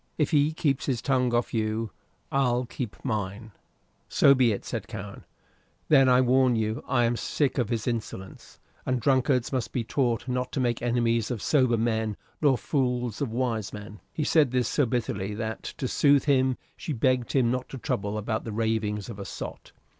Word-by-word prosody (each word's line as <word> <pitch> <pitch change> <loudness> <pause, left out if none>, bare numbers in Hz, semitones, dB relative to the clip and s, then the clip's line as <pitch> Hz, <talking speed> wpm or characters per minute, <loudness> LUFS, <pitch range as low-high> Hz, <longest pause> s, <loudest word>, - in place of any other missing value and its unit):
"If 150 0 +1
he 150 -1 +3
keeps 145 -4 -1
his 130 -4 0
tongue 130 -2 +1
off 120 0 0
you, 110 -1 -1 0.4
I'll 125 -2 +1
keep 120 -2 -5
mine." 110 -1 -3 0.6
"So 140 - +6
be 125 -3 +3
it," 100 - -4
said - - -4
Cowen. - - -8 0.6
"Then 135 -3 +6
I 125 0 +5
warn 130 0 +4
you 110 +1 -1
I 120 -2 +2
am 120 +1 +1
sick 140 +3 -1
of 120 -4 0
his 115 -2 -2
insolence; 110 -5 -5 0.2
and 130 -1 0
drunkards 130 -1 +2
must 115 -3 -1
be 120 - -1
taught 120 0 0
not 125 0 -2
to - - -1
make 120 -2 0
enemies 115 -2 +1
of 120 -3 -3
sober 130 -1 +2
men 110 -2 0 0.2
nor 140 -4 +4
fools 125 -5 -1
of 135 -6 -1
wise 115 -4 -1
men." 105 0 -9
He 155 - -2
said 150 -3 +4
this 125 0 +1
so 145 -4 +1
bitterly 105 -4 -2
that, 110 0 -4 0.2
to 130 - -2
soothe 140 +1 +4
him, 130 -3 +3 0.2
she 155 - -4
begged 130 0 +1
him 125 -4 +3
not 125 0 -3
to 135 - -7
trouble 100 -2 -2
about 110 +1 -2
the 115 - -5
ravings 105 -2 -1
of 105 -4 -8
a 100 - -5
sot. - - -7
120 Hz, 190 wpm, -27 LUFS, 110-130 Hz, 0.6 s, So